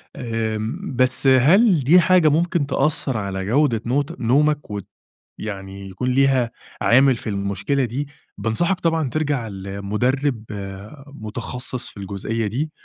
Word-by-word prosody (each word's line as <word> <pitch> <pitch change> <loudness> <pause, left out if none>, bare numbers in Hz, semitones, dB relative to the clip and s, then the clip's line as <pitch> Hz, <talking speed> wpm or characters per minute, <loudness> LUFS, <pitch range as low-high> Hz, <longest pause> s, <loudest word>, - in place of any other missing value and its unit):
آمم 115 - -3
بس 130 +2 +4
هل 165 - +5
دي 170 +8 +6
حاجة 175 -2 +4
ممكن 165 0 +1
تأثّر 140 -3 0
على 95 -2 -3
جودة 120 0 +2
نوت 140 +4 -1
نومك 145 +2 +1
وت 100 -2 -5 0.5
يعني 95 -2 -7
يكون 95 +7 -4
ليها 130 -2 +2 0.3
عامل 130 +2 +4
في 115 - -7
المشكلة 100 +7 -1
دي، 135 +5 -3 0.3
بانصحك 175 +12 0
طبعًا 165 -6 0
ترجع 145 -7 -1
لمدرب 105 +6 -2 0.7
متخصّص 125 +2 -6
في - - -15
الجزئية 100 +3 -3
دي، 135 +9 -2
125 Hz, 125 wpm, -21 LUFS, 110-145 Hz, 0.7 s, دي